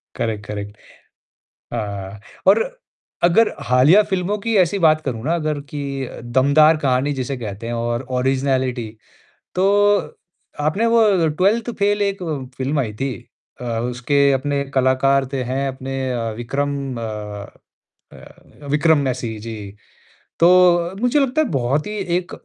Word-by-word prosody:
Correct, 105 -2 -3
correct 105 0 -6 1.0
हाँ, 100 -3 -5 0.3
और 205 +4 +6 0.6
अगर 180 +7 +4
हालिया 130 - +5
फ़िल्मों 190 +1 -1
की 225 +2 -1
ऐसी 185 +2 +2
बात 155 -3 +4
करूँ 115 -4 -4
ना 160 +4 +1
अगर 155 -3 -2
कि 140 -2 -4
अ, - - -10
दमदार 140 +6 +4
कहानी 140 -1 +1
जिसे 135 0 -3
कहते 110 -2 -6
हैं 120 - -3
और 120 +1 -2 0.2
ऑरिज़नैलिटी, 130 -2 0 0.7
तो 205 +2 +2 0.4
आपने 175 +10 +1
वो 210 -8 +4
ट्वेल्थ 200 +9 +1
फ़ेल 205 +1 +2
एक 200 -1 -1 0.3
फ़िल्म 135 +3 -1
आई 115 -5 -3
थी। 135 +4 -2 0.5
अ, - - -6 0.3
उसके 140 +3 +2
अपने 140 +1 0
कलाकार 135 +1 +2
थे 135 -2 -1
हैं 135 +1 -1
अपने 135 0 -5
अ, 115 -2 -2
विक्रम 140 +4 -2 0.2
अ 105 -2 -6 0.7
अ, 145 - -16
विक्रम 155 +2 +3
मेसी 125 -5 -2
जी, 105 -3 -7 0.7
तो 175 0 +5
मुझे 245 +4 +3
लगता 275 +2 +1
है 310 - +1
बहुत 135 +2 0
ही - - -5 0.3
एक 180 -1 -5
140 Hz, 140 wpm, -20 LUFS, 120-175 Hz, 1.0 s, और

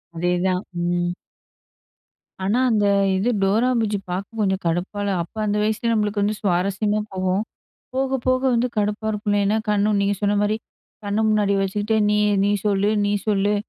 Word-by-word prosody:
அதேதான். 180 +2 0 0.2
ம். 175 0 0 1.3
ஆனா. 205 +6 +1
அந்த 210 -2 +2 0.3
இது 210 +6 +1
"டோரா 215 +6 +2
புஜ்ஜி" 210 -2 0
பார்க்க 200 +5 -5
கொஞ்சம் 190 -2 0
கடுப்பா 175 +5 -2
இல்ல. 200 -1 0
அப்போ 175 +6 -16
அந்த 210 0 0
வயசுலயே 220 +2 0
நம்மளுக்கு 210 -1 0
வந்து 210 +1 0
சுவாரஸ்யமா 200 +3 0
போகும். 185 +2 0 0.5
போக 265 0 0
போக 255 0 +3
வந்து 235 +2 +2
கடுப்பா 210 +1 -1
இருக்கும். 210 0 -2
இல்லைன்னா 205 +1 +2
கண்ணு 210 0 +2
நீங்க 200 0 +1
சொன்ன 205 0 +2
மாதிரி 215 +1 +1 0.5
கண்ணு 205 +2 0
முன்னாடி 210 -2 +2
வச்சுக்கிட்டு 205 +3 -1
"நீ 210 - +2 0.3
நீ 205 - +2
சொல்லு 200 0 +2 0.2
நீ 205 - +1
சொல்லு." 205 0 +2
205 Hz, 160 wpm, -22 LUFS, 195-215 Hz, 1.3 s, போக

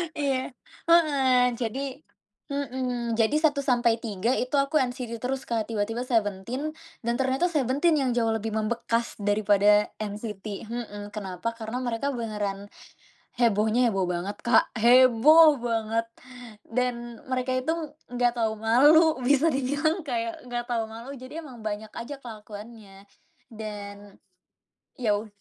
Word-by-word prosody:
Iya, 270 -3 -1 0.3
heeh, 270 -7 +4
jadi 235 +2 -3 0.7
mhm, 250 -4 -2
jadi 225 +6 +3
1 290 -2 +3
sampai 240 -4 +2
3 220 +1 -1
itu 255 +3 -1
aku 275 +2 +2
NCT 245 -2 -3
terus 260 +3 -3
Kak, 225 -2 -1
tiba-tiba 225 +2 -2
Seventeen 230 +6 -1 0.3
dan 235 - 0
ternyata 265 +7 +1
Seventeen 295 +3 +2
yang 260 -2 +1
jauh 225 -2 +2
lebih 220 0 -2
membekas 230 +1 -1
dari 205 +1 +1
pada 205 +1 +4
NCT, 210 -1 -6 0.2
mhm, 230 -3 -5
kenapa? 200 +1 -4
Karena 225 +3 -4
mereka 245 +4 -2
beneran 205 -4 -4 0.7
hebohnya 230 +1 +3
heboh 195 -4 0
banget 180 +3 -3
Kak, 235 - +4
heboh 255 +6 +7
banget 230 -1 -1 0.6
dan 240 -1 -2
mereka 255 0 -1
itu 255 +5 -1 0.4
enggak 245 -1 +2
tahu 220 -1 +1
malu, 290 +8 +5
bisa 285 +5 +3
dibilang 290 +6 0
kayak 230 -2 -3
enggak 240 -1 -3
tahu 230 -2 0
malu, 230 +5 -9
jadi 260 +6 -8
emang 250 -6 -11
banyak 215 0 -4
aja 260 +5 -6
kelakuannya. 210 -3 -11 0.5
Dan 205 -2 -8 0.8
ya 215 -4 +2
ud 215 - -8
235 Hz, 130 wpm, -26 LUFS, 215-260 Hz, 0.8 s, heboh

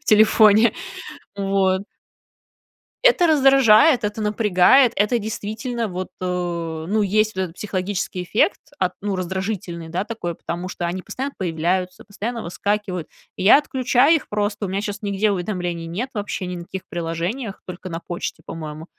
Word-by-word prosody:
в - - -30
телефоне? 215 -1 +6 0.6
Вот. 195 -1 +1 1.2
Это - - +5
раздражает, 270 -4 +5
это 210 +1 -2
напрягает, 210 +4 +4
это 210 +4 +2
действительно, 220 +2 -3
вот, 185 0 -5
э, - - -3
ну, 175 +1 -2
есть 215 +1 +1
вот 190 - -1
этот 175 -2 -7
психологический 190 -2 -3
эффект, 230 - +1 0.2
от, 185 -1 0
ну, 200 -1 -1
раздражительный, 185 -2 -4
да, 175 +3 -1
такой, 210 -7 -4
потому 175 +3 -5
что 175 - -4
они 175 +2 -3
постоянно 270 +8 -5
появляются, 180 +1 -1
постоянно 225 +3 -5
выскакивают. 190 -1 -2 0.3
И - - -3
я 205 - +8
отключаю 265 +1 +3
их 295 - -11
просто, 205 0 -1
у - - -5
меня 195 +2 -1
щас 205 -1 -5
нигде 205 0 +1
уведомлений 175 -3 -3
нет 230 +11 -4
вообще 205 -3 -3
ни 180 0 -4
на 170 - -7
каких 190 +1 -6
приложениях, 175 +7 -3
только 185 +1 -8
на 165 -1 -4
почте, 175 0 -5
по-моему, 155 -1 -7
200 Hz, 155 wpm, -22 LUFS, 180-220 Hz, 1.2 s, я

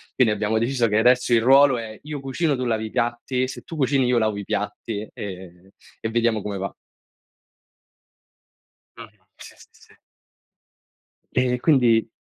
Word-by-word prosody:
Quindi 115 -5 +3
abbiamo 105 +1 -1
deciso 120 0 +1
che 105 - +1
adesso 125 +2 +3
il 115 - +4
ruolo 135 +1 +5
è 110 -2 -7
io 150 -1 -6
cucino, 135 +3 -1
tu 130 0 -3
lavi 110 -2 -1
i - - -6
piatti, 125 +2 -1
se 130 - -8
tu 165 - -10
cucini 135 -1 +2
io 125 -1 +2
lavo 110 -2 0
i 100 - -5
piatti 110 -1 -4
e 95 -1 -9 0.3
e 110 - -3
vediamo 115 -2 +1
come 100 -1 -4
va. 95 +1 -5 2.2
Mh-mh, - - -14
sì, - - -13
sì, - - -18
sì. - - -22 1.3
E 125 -1 +1
quindi 120 -7 +3
120 Hz, 155 wpm, -23 LUFS, 110-130 Hz, 2.2 s, ruolo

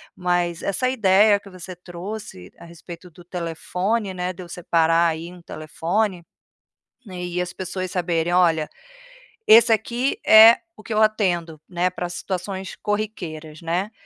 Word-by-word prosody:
mas 175 -2 -1
essa 255 +6 0
ideia 205 -3 +4
que 200 - -15
você 185 -1 -10
trouxe 175 - -9
a - - -12
respeito 170 +1 -12
do 175 +2 -16
telefone, 180 +5 -3
né, 180 0 -3
de 185 - -11
eu 175 - -13
separar 170 -1 +2
aí 165 +2 -5
um 180 - -14
telefone, 170 +5 -3 0.8
e 180 -1 -5
as 175 0 -5
pessoas 185 0 -5
saberem 175 -2 -1
olha, 165 -4 +3 0.8
esse 230 +1 +7
aqui 235 +5 -1
é 220 +2 +9 0.2
o - - -14
que 225 - -5
eu 215 - +2
atendo, 175 -8 0
né, 180 0 0
para 180 -1 -5
situações 190 +1 -5
corriqueiras, 175 -8 -5
né, 175 +5 -2
180 Hz, 145 wpm, -22 LUFS, 170-205 Hz, 0.8 s, é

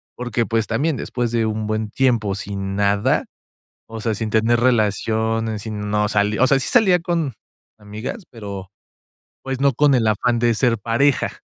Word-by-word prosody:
porque, 120 -1 -2
pues, 115 -2 0
también, 140 +6 0
después 120 0 -3
de 115 -1 +1
un 110 0 -2
buen 110 0 -2
tiempo 115 -6 +1
sin 100 -1 -4
nada, 100 0 +1 0.6
o 115 -1 -7
sea, 110 -1 -1
sin 110 +1 -4
tener 115 +2 +3
relaciones, 110 -1 0
sin 105 -2 -5
no 105 0 +2
sali 105 +1 +1
o 130 - +5
sea, 135 0 +3
sí - - -2
salía 200 -7 +5
con 165 -5 -2 0.4
amigas, 110 - -7
pero, 100 -4 -8 0.7
pues, 135 0 -4
no 140 -1 +4
con 145 +2 +3
el 115 -3 +2
afán 120 +3 +1
de 120 0 +3
ser 115 +1 +2
pareja. 120 +6 0
115 Hz, 170 wpm, -21 LUFS, 105-125 Hz, 0.7 s, o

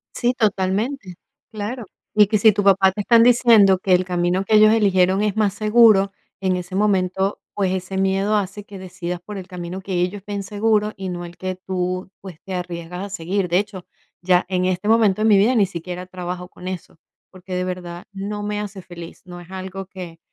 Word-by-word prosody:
Sí, 245 0 +1
totalmente. 210 0 -1 0.4
Claro. 220 +2 -5 0.3
Y 210 -1 +6
que 215 +1 +2
si 220 +1 +6
tu 205 0 -1
papá 195 -1 +5
te 205 +2 -4
están 230 +2 +5
diciendo 230 -5 +6
que 185 0 +1
el 180 +1 +4
camino 180 +1 0
que 215 +2 +2
ellos 215 0 +7
eligieron 195 -3 +3
es 210 -1 0
más 205 -3 +2
seguro, 215 -2 +4 0.3
en 190 -1 +1
ese 180 +1 -6
momento, 190 -1 +1
pues 195 -3 0
ese 190 +1 -3
miedo 195 +2 +1
hace 205 0 -2
que 200 - -10
decidas 180 -1 -6
por 205 +3 -8
el 185 -2 -8
camino 180 0 -6
que 190 0 -6
ellos 190 +3 -2
ven 200 -1 -3
seguro 210 +1 +1
y 190 -1 -5
no 175 -1 -5
el 175 0 -12
que 185 0 -4
tú, 185 0 -3
pues, 185 -5 -11
te 190 - -7
arriesgas 180 +1 -5
a - - -8
seguir. 190 0 -2
De 175 +1 +2
hecho, 200 -3 -6 0.4
ya, 180 0 +3
en 185 -1 0
este 185 +2 -1
momento 215 -3 +3
de 220 - +3
mi 205 - +6
vida, 220 +6 +3
ni 210 -4 +4
siquiera 180 0 -6
trabajo 180 -1 -6
con 180 - -11
eso, 185 -3 -7 0.3
porque 185 0 -8
de 180 - -1
verdad 180 -1 -6
no 205 +1 -5
me 210 0 -2
hace 200 -2 -6
feliz, 175 -2 -11
no 175 -1 -10
es 175 0 -14
algo 190 0 -6
que, 180 -3 -10
190 Hz, 210 wpm, -21 LUFS, 180-205 Hz, 0.4 s, ellos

